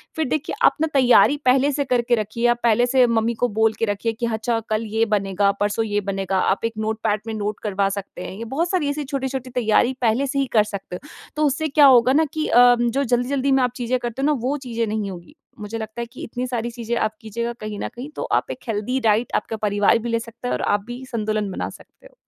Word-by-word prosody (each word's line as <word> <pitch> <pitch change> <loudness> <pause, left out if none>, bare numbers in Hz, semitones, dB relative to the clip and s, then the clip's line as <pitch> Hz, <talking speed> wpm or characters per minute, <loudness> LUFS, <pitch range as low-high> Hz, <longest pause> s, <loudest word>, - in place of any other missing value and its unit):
फिर 320 - 0
देखिए 310 +2 -2
आप - - +5
न 320 - +3
तैयारी 270 +2 +5
पहले 270 +3 +4
से 285 +1 0
करके 240 -1 +2
रखिए, 220 +2 -3
आप 240 0 +2
पहले 235 +1 +4
से 255 0 +4
मम्मी 230 0 +1
को 245 - +5
बोल 220 0 +3
के 225 - +2
रखिए 205 +2 -2
कि 230 +2 -3
अच्छा 225 +1 -1
कल 215 +1 0
ये 220 +1 0
बनेगा, 200 0 +2
परसों 205 +2 +1
ये 205 -1 -1
बनेगा, 195 -1 -2
आप 195 +4 +1
एक 230 - -2
नोटपैड 215 -1 -1
में 225 - -3
नोट 210 -1 -3
करवा 200 -2 0
सकते 200 0 -6
हैं, - - -6
ये 230 - -6
बहुत 335 +3 0
सारी 340 -6 +1
ऐसी 295 +1 -2
छोटी-छोटी 265 -2 -4
तैयारी 240 +1 +2
पहले 240 +4 +2
से 275 +1 -1
ही 275 - +2
कर 215 - +6
सकते 200 -3 -7
हो। 295 - -10 0.3
तो 305 0 +1
उससे 315 +3 0
क्या 290 0 +5
होगा 255 -1 +6
न 315 +3 +4
कि 310 0 -1
अ, 245 0 +6
जो 240 +3 +1
जल्दी-जल्दी 260 +2 0
में 265 -1 +4
आप 250 - +1
चीज़ें 250 0 -1
करते 240 +2 -4
हो - - +1
ना 300 - +3 0.2
वो 290 +2 0
चीज़ें 230 -1 -1
नहीं 210 -2 -2
होगी। 175 - -11 0.2
मुझे 210 +2 -5
लगता 220 +1 -6
है - - -3
कि - - -9
इतनी 250 +2 -4
सारी 240 -1 -2
चीज़ें 235 0 -4
आप 215 - 0
कीजिएगा 235 +2 -4
कहीं 215 -1 -5
न - - -2
कहीं 260 +5 -7
तो - - -3 0.2
आप - - -9
एक - - -7
हेल्दी 225 +4 -1
डाइट 225 0 +1
आपका 225 - -2
परिवार 205 +3 +3
भी 235 +1 -5
ले 230 0 +1
सकते 230 +2 -8
है - - -1
और - - -2
आप 205 -1 +1
भी 245 +2 -7
संतुलन 215 -2 -1
बना - - -4
सकते - - -16
हो। - - -26
235 Hz, 255 wpm, -22 LUFS, 215-260 Hz, 0.3 s, कर